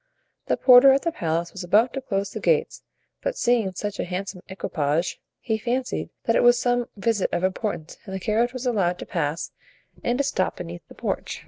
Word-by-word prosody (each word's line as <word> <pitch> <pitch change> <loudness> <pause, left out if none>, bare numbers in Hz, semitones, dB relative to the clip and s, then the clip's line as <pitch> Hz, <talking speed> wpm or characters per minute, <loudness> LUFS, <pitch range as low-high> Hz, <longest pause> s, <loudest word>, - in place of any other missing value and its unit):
The - - +1
porter 255 +1 +8
at 275 - +1
the 335 - 0
palace 170 - -2
was 190 - -7
about 215 +7 +3
to 270 - -3
close 200 -6 -2
the - - -5
gates, 470 -1 +1 0.4
but - - -2
seeing 235 -6 +2
such 205 +2 -4
a - - +1
handsome 185 +1 -5
equipage 165 -3 -1 0.2
he 220 -2 -2
fancied 250 +3 -2
that 230 - +2
it - - +4
was 240 0 +6
some 245 -1 +1
visit 205 -1 +1
of 175 - -1
importance 185 -3 -2
and 190 -2 -6
the - - -3
carriage 220 +5 +1
was 255 0 -6
allowed 190 -8 +1
to - - -7
pass 150 +3 -2 0.5
and 240 +1 +1
to 280 - +2
stop 265 -9 0
beneath 175 0 -8
the - - -14
porch. - - -3
210 Hz, 205 wpm, -24 LUFS, 180-245 Hz, 0.5 s, porter